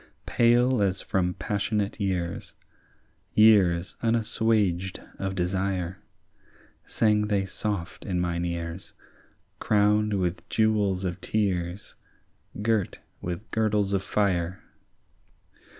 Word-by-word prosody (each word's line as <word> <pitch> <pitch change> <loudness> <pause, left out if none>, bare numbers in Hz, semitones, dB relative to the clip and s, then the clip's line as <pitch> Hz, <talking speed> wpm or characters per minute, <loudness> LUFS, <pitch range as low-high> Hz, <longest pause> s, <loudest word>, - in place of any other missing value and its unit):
Pale 120 0 +3
as 95 -1 +1
from 90 -1 -1
passionate 100 +2 -2
years, 90 -3 -2 0.8
Years 95 -5 +5
unassuaged 110 -5 +1 0.2
of 95 -1 -2
desire, 95 0 -1 0.9
Sang 105 -1 +2
they 100 -2 +1
soft 100 -3 -4
in 90 -2 -2
mine 85 -1 -1
ears, 85 +1 -5 0.7
Crowned 105 0 +2
with 90 -1 -2
jewels 105 -4 +1
of 90 0 -4
tears, 95 -3 -1 0.7
Girt 110 -3 0 0.2
with 90 +5 -5
girdles 105 -2 +1
of 100 - +1
fire. 95 -3 0
100 Hz, 95 wpm, -26 LUFS, 90-105 Hz, 0.9 s, Years